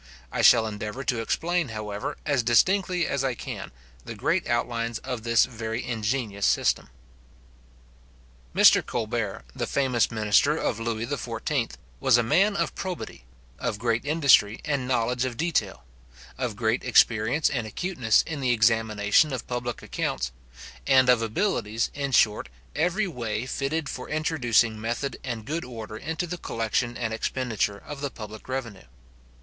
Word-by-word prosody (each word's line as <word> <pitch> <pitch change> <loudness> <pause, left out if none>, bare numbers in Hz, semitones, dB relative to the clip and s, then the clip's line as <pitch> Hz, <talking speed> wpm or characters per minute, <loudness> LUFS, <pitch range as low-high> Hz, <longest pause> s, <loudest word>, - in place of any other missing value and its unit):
I - - -1
shall 115 -2 +7
endeavour 110 +4 -5
to 120 -2 0
explain, 170 +7 0
however, 105 -2 -5
as 140 -4 +2
distinctly 180 - +3
as 140 -1 -1
I 130 -2 0
can, - - -7 0.3
the - - -7
great - - 0
outlines 120 -1 -1
of 125 -2 -5
this 115 0 +4
very 115 -1 -4
ingenious 110 -3 -1
system. - - +1 1.7
Mr. - - +7
Colbert, 110 -3 -3
the 120 -3 -2
famous 130 -5 +1
minister 110 +7 +3
of 115 - -1
Lewis 115 +2 -3
XIV. 125 -1 -2 0.3
was 130 -3 +4
a 120 - +2
man 200 - +3
of - - -1
probity, 180 - -6 0.3
of - - -2
great 115 +1 0
industry, 140 -8 +4
and 140 -4 -1
knowledge 125 0 +1
of 125 -3 -3
detail; 150 - -1 0.5
of 125 -4 -3
great 110 +2 0
experience 120 +3 +3
and 120 -5 -2
acuteness 125 - +1
in 150 -4 -5
the 130 - 0
examination 110 +3 +3
of 130 - -4
public 120 -1 -4
accounts; - - -2 0.6
and 130 -1 +5
of 125 -2 +5
abilities, 115 - -1
in 140 -1 -3
short, 105 -4 +3 0.3
every 180 +7 +1
way 115 -7 -3
fitted 140 +4 -2
for 125 - -6
introducing 120 -8 +1
method 120 +5 -3
and 115 -4 -4
good 160 +4 -3
order 110 -3 -8
into 160 - -3
the 175 0 -6
collection 115 +2 -1
and 115 -2 -2
expenditure 115 -4 -1
of 145 -2 -7
the 140 - -1
public 110 -1 -10
revenue. 120 -7 -5
120 Hz, 150 wpm, -26 LUFS, 110-140 Hz, 1.7 s, shall